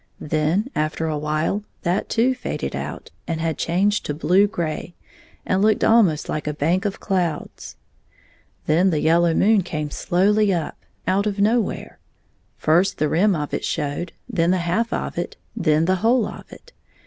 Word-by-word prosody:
Then, 155 - 0
after 155 +1 -1
awhile, 155 +5 -1 0.2
that 175 +3 0
too 235 +3 +2
had 260 - -1
faded - - -4
out, - - -6 0.2
and 165 -2 -2
had 160 -1 -2
changed 195 +5 +1
to 145 - -2
blue 185 +6 +3
gray, 170 -3 -4 0.5
and 185 +1 +1
looked 215 0 +3
almost 200 -10 +4
like 155 - -3
a 150 - -2
bank 170 +7 0
of 200 - -2
clouds. 180 -6 -3 0.9
Then 170 +5 +3
the 155 -4 0
yellow 165 +2 +3
moon 215 0 +4
came 155 -4 -4
slowly 200 +6 +2
up, 170 -4 -3 0.2
out 195 +3 +1
of 205 -1 -2
nowhere. 220 +1 0 0.6
First 175 +5 +2
the 150 - +1
rim 195 +3 +3
of 150 -2 -4
it - - -2
showed, 150 +3 -2 0.2
then 175 -8 +1
the 185 - +3
half 220 +7 0
of - - -3
it, 175 - -5 0.2
then 155 -1 +2
the 185 +2 +2
whole 230 +3 +3
of - - -9
it. - - -14
175 Hz, 170 wpm, -22 LUFS, 155-205 Hz, 0.9 s, almost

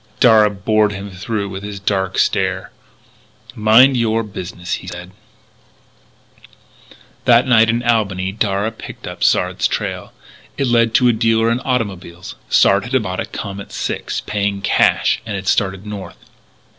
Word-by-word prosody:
Darragh 105 -4 +4
bored 110 -1 +3
him 100 0 -7
through 100 +3 -4
with 95 0 -7
his 100 -1 -7
dark 95 -1 -1
stare: 95 0 0 0.8
"Mind 115 +5 +5
your 115 -1 +1
business," 90 -4 -6
he 90 - -12
said. 90 0 -8 2.1
That 120 -1 +5
night 115 -3 +4
in 120 +1 0
Albany 100 -6 0
Darragh 105 +1 -2
picked - - -9
up - - -6
Sard's - - +2
trail. - - -4 0.5
It - - 0
led 115 -2 +2
to 125 - +5
a - - +3
dealer 115 0 +2
in 120 - 0
automobiles. 100 -10 -4 0.2
Sard 100 +1 +4
had 130 -2 0
bought 90 -2 -4
a - - -2
Comet 100 0 -7
Six, - - -3
paying 100 -1 -2
cash, 100 - +2
and 110 -3 -5
had 95 0 -5
started 95 -1 0
north. 105 -2 -8
105 Hz, 145 wpm, -18 LUFS, 95-115 Hz, 2.1 s, Mind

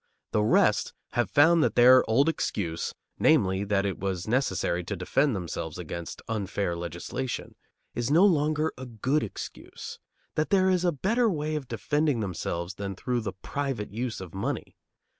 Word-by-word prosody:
The 105 - +2
rest 105 - +3 0.2
have 120 - 0
found 160 +3 +5
that - - +1
their 125 +1 +8
old 135 +7 +4
excuse 90 - -1 0.3
(namely, 100 -11 +3
that 100 -1 +1
it 95 -2 -2
was 95 -1 -3
necessary 100 -7 0
to 100 - -3
defend 130 +8 +1
themselves 85 -3 -4
against 85 -1 -6
unfair 100 -4 -2
legislation) 85 +9 -4 0.4
is 120 +1 -2
no 165 +7 +6
longer 155 -3 +2
a 130 - -6
good 125 +6 0
excuse; 105 - -7 0.3
that 155 - 0
there 190 -1 +4
is 180 -1 +2
a 175 - +3
better 220 - +1
way 155 -4 -2
of 145 -4 -4
defending 145 +4 0
themselves 90 -3 -3
than 100 0 -5
through 125 +4 -1
the 100 -3 -4
private 135 -8 -3
use 120 +1 -3
of 95 -3 -9
money. 95 - -3
120 Hz, 160 wpm, -27 LUFS, 95-150 Hz, 0.4 s, their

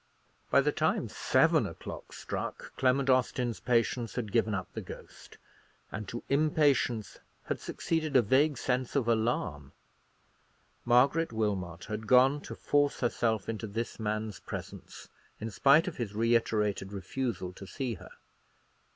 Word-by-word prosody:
By - - +5
the - - +1
time - - 0
seven - - +3
o'clock - - -9
struck, - - -6
Clement 130 +1 +2
Austin's 125 -2 +1
patience 120 -1 0
had 110 -5 -3
given 110 -2 +2
up 95 -2 -3
the - - -4
ghost; - - -12 0.5
and 105 0 -5
to 120 - -6
impatience 140 - +2 0.2
had - - -3
succeeded 160 -3 -2
a 125 - +7
vague 135 +6 +3
sense 125 0 -1
of 130 -5 +1
alarm. 110 - 0 1.1
Margaret 135 +7 +4
Wilmot 95 -6 -2
had 110 0 -5
gone 130 +5 +5
to - - -7
force 145 -1 +1
herself 115 -4 0
into 110 0 -4
this 115 +4 -4
man's 105 -1 -2
presence, - - -8 0.3
in 110 +1 -4
spite 140 - +5
of 180 - -4
his 105 -4 -4
reiterated 110 -3 +1
refusal 100 -1 -3
to 95 +1 -10
see 125 +6 -3
her. 95 - -11
115 Hz, 140 wpm, -30 LUFS, 105-130 Hz, 1.1 s, a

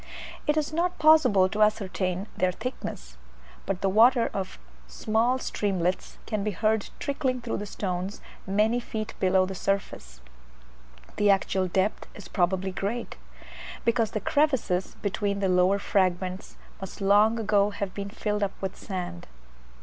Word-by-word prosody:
It 300 +1 +2
is 310 0 -1
not 355 +2 0
possible 310 -12 +5
to 210 +3 -3
ascertain 195 -3 +1
their 185 0 +1
thickness, 65 - -6 0.5
but 195 -2 -2
the 195 - +1
water 235 +4 +5
of 190 -2 -4 0.3
small 225 - +1
streamlets 190 -7 -2
can 215 -3 -2
be 210 - 0
heard 215 +2 0
trickling 260 -2 -1
through 235 -1 -3
the 205 - -5
stones 190 0 -4 0.3
many 215 +5 +2
feet 220 -2 -5
below 185 0 +3
the 190 - -5
surface. 180 - -3 1.0
The 205 0 +3
actual 190 -1 +2
depth 190 +3 -1
is 200 -4 -10
probably 190 +1 0
great, 210 +6 -3 0.7
because 230 -1 +2
the 215 - -3
crevices 230 -8 +1
between 200 0 -1
the 195 -1 +1
lower 180 +2 +4
fragments 185 -1 -1 0.2
must 195 -1 -8
long 205 +3 +4
ago 205 -2 +3
have 200 -2 -4
been 200 0 -5
filled 210 0 -2
up 200 -1 -2
with 190 -1 -4
sand. 180 - -6
200 Hz, 145 wpm, -27 LUFS, 185-220 Hz, 1.0 s, possible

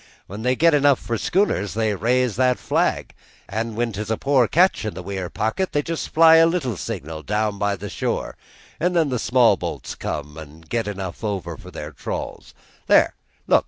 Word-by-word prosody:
"When 100 +3 -8
they 125 +2 +1
get 165 +4 +4
enough 145 -2 +4
for 115 - -4
schooners 115 - 0
they 110 -1 +1
raise 120 +3 +1
that 125 0 +2
flag; - - -1 0.3
an' 110 +2 -3
when 120 +1 -1
'tis 105 +2 -5
a 110 - 0
poor 135 -4 +3
catch 180 - +3
in 110 -5 -4
the 90 - -7
weir 95 -1 -4
pocket 180 - -2
they 145 - +1
just 165 +1 -4
fly 165 0 +7
a 165 0 +6
little 165 - -1
signal 80 -1 -6
down 105 +2 -1
by 100 0 +1
the 95 - -7
shore, - - -3 0.4
an' 180 +3 +1
then 165 -4 +2
the 125 -2 -1
small 120 +1 +4
bo'ts - - -5
comes 75 +1 -5
and 80 +1 -12
get 115 +2 -2
enough 95 -2 -5
an' 110 - 0
over 100 -4 -4
for - - -12
their - - -7
trawls. - - -6 0.3
There, - - +5 0.3
look! - - +5
115 Hz, 200 wpm, -22 LUFS, 100-140 Hz, 0.4 s, fly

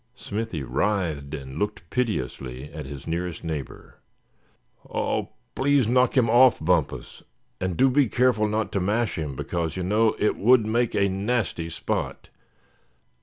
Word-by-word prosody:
Smithy 105 -8 -4
writhed, 75 -1 -1
and 65 0 -7
looked 105 -4 -3
piteously 70 - -3
at 75 -3 -6
his 70 -1 -8
nearest 85 +1 -3
neighbor. 80 -4 -6 0.9
"Oh! - - -1 0.2
please 140 -3 +2
knock 125 +2 +3
him 120 -3 +5
off, 120 +2 +6
Bumpus; 80 -2 -1 0.4
and 95 -2 -2
do 135 - +5
be 135 +1 +3
careful 115 -1 +2
not 110 +1 -1
to 100 - 0
mash 105 +2 0
him, 75 -4 -4
because 85 +4 -3
you 90 - -2
know, 110 +4 +2
it 105 - +1
would 120 +1 +5
make 115 +2 0
a 100 -1 +3
nasty 100 -3 -1
spot. 80 - -3
100 Hz, 145 wpm, -25 LUFS, 80-115 Hz, 0.9 s, off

